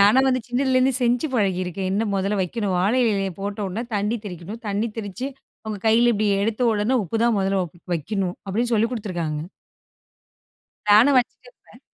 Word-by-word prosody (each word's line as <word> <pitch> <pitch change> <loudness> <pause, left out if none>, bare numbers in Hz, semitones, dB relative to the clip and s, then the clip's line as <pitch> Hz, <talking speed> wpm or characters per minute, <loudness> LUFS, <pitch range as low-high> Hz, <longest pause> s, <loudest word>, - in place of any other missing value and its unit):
நானா 210 +6 +6
வந்து 255 0 +1
சின்னதுலருந்தே 260 +1 +2
செஞ்சு 245 +5 +2
பழகியிருக்கேன், 185 -3 -1
என்ன 215 +3 0
முதல்ல 195 +1 0
வெக்கணும். 195 +1 -2
வாழை 210 +8 +2
இலையிலய 195 -4 +1
போட்ட 200 +1 -4
உடனே 215 +6 -4
தண்ணி 210 +3 0
தெறிக்கணும். 190 +5 -8
தண்ணி 205 +3 0
தெறிச்சு. 220 +6 -4 0.4
அவுங்க 215 -2 -4
கைல 235 +2 +5
இப்டி 215 -1 0 0.2
எடுத்த 225 +3 -1
உடனே, 215 +4 +1
உப்பு 205 +6 -3
தான் 235 -2 +3
முதல்ல 195 0 +1
ஒ - - -6 0.3
வெக்கணும். 180 +3 -2
அப்டின்னு 235 +5 0
சொல்லிக் 225 +2 +2
குடுத்துருக்காங்க! 175 -9 -3 1.5
நானும் 245 +7 +6
வச்சிட்டுருப்பேன். 375 - -4
210 Hz, 155 wpm, -23 LUFS, 195-235 Hz, 1.5 s, நானா